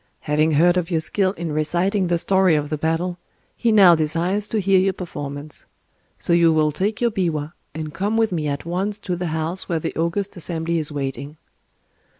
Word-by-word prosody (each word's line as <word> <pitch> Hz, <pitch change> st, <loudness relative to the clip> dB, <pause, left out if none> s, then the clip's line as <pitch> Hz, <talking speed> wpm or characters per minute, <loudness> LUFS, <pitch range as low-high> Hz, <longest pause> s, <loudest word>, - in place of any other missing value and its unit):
Having 155 Hz, +1 st, +1 dB
heard 175 Hz, +4 st, +4 dB
of 175 Hz, -2 st, -1 dB
your 165 Hz, -3 st, +1 dB
skill 185 Hz, +4 st, +1 dB
in 170 Hz, -4 st, -5 dB
reciting 175 Hz, +6 st, 0 dB
the 175 Hz, 0 st, +1 dB
story 190 Hz, -1 st, +3 dB
of 150 Hz, 0 st, -2 dB
the 155 Hz, -, -1 dB
battle, 170 Hz, +3 st, -1 dB, 0.4 s
he 235 Hz, -, +1 dB
now 195 Hz, -5 st, +7 dB
desires 170 Hz, +6 st, 0 dB
to 220 Hz, -, -1 dB
hear 195 Hz, -1 st, +3 dB
your 190 Hz, +1 st, +2 dB
performance: 145 Hz, -4 st, -7 dB, 0.5 s
so 170 Hz, -, -1 dB
you 170 Hz, -1 st, +5 dB
will 155 Hz, -1 st, +2 dB
take 195 Hz, +8 st, 0 dB
your 235 Hz, -1 st, +1 dB
biwa 165 Hz, -6 st, -2 dB, 0.2 s
and 155 Hz, -1 st, -5 dB
come 205 Hz, +3 st, -1 dB
with 225 Hz, -2 st, +2 dB
me 155 Hz, -4 st, -2 dB
at 140 Hz, +1 st, -3 dB
once 190 Hz, +4 st, -2 dB
to 185 Hz, -3 st, -3 dB
the 175 Hz, 0 st, -3 dB
house 160 Hz, +3 st, -3 dB
where 170 Hz, -, +1 dB
the 165 Hz, -, -4 dB
august 180 Hz, +5 st, -2 dB
assembly 170 Hz, -1 st, -2 dB
is 155 Hz, -1 st, -1 dB
waiting." 140 Hz, +1 st, -5 dB
170 Hz, 195 wpm, -22 LUFS, 155-190 Hz, 0.5 s, now